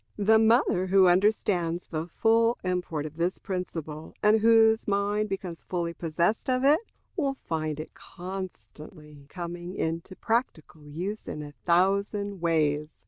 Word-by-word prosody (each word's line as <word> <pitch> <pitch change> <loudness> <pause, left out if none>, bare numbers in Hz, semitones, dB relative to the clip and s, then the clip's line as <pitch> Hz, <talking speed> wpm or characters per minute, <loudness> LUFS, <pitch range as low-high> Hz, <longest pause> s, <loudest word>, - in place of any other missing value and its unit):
The 220 +2 +4
mother 220 -5 +3
who 190 0 +5
understands 180 -2 +1
the 160 0 -4
full 230 +6 +2
import 180 -5 -2
of 155 +1 -8
this 175 +2 0
principle, 165 -5 -6
and 215 +1 +5
whose 225 0 +4
mind 205 +1 0
becomes 190 -3 -5
fully 170 -2 -3
possessed 170 +9 -1
of 255 0 +1
it, 295 +3 +6 0.4
will 280 -6 -1
find 155 - -3
it 155 - -7
constantly 155 -5 -9
coming 175 +1 -6
into 165 +3 -3
practical 165 - -3
use 180 +8 -5
in 150 - -5
a 145 - -9
thousand 200 +4 0
ways. 155 -3 +1
180 Hz, 140 wpm, -27 LUFS, 165-210 Hz, 0.4 s, it